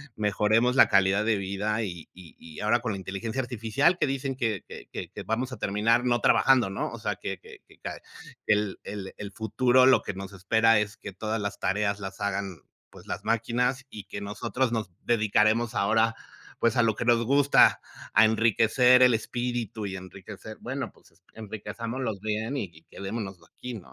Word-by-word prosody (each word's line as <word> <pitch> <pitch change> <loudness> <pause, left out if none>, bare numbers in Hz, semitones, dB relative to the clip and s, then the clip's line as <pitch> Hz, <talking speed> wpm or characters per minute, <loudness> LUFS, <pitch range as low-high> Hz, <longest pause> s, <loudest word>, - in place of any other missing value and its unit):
mejoremos 110 +4 +2
la - - +7
calidad 100 +1 +3
de 110 -2 +2
vida. 100 +3 -2
Y 85 -6 -7
y 90 -3 -14
y 80 -2 -11
ahora 110 +3 +2
con 115 -4 -2
la - - -4
inteligencia 110 +6 -4
artificial, 125 - +1
que - - +2
dicen 135 0 -2
que 110 -6 -2
que - - -10 0.2
que - - -8
vamos 125 +4 -2
a 130 - -6
terminar 110 +5 +1
no 120 -1 +2
trabajando, 130 -6 +4
¿no? 95 - -3
O - - -7
sea, - - -2
que - - -5
que - - -14
que - - -20 0.7
el 105 -1 +1
el 100 -2 -7
el 100 -1 -7
futuro 125 +5 +3
lo 130 - +6
que - - -5
nos 95 +1 -7
espera 110 +4 +3
es 105 +2 -3
que 100 - -9
todas 110 +4 -3
las 100 - -4
tareas 100 +1 0
las 95 -1 -7
hagan, 100 -2 -2 0.3
pues, - - -16
las - - -5
máquinas, 125 +3 0
y 105 -5 -9
que 100 - -7
nosotros 115 +5 -2
nos 110 -6 -2
dedicaremos 110 +1 +2
ahora, 110 +3 +2 0.4
pues, 115 +1 +2
a 120 - +5
lo 110 -2 +2
que 120 - -4
nos 120 -1 +4
gusta, 140 +3 +5 0.3
a 110 - +7
enriquecer 115 +3 +4
el 125 - +6
espíritu 120 -1 -3
y 95 - -4
enriquecer, 95 +4 -10
bueno, 130 -2 -4
pues, - - -25 0.2
enriquezcámoslo 115 +3 -5
bien 110 +5 -2
y 85 -9 -6
quedémonos 100 -1 -5
aquí, 125 +9 -9
¿no? 100 - -11
110 Hz, 185 wpm, -27 LUFS, 100-120 Hz, 0.7 s, la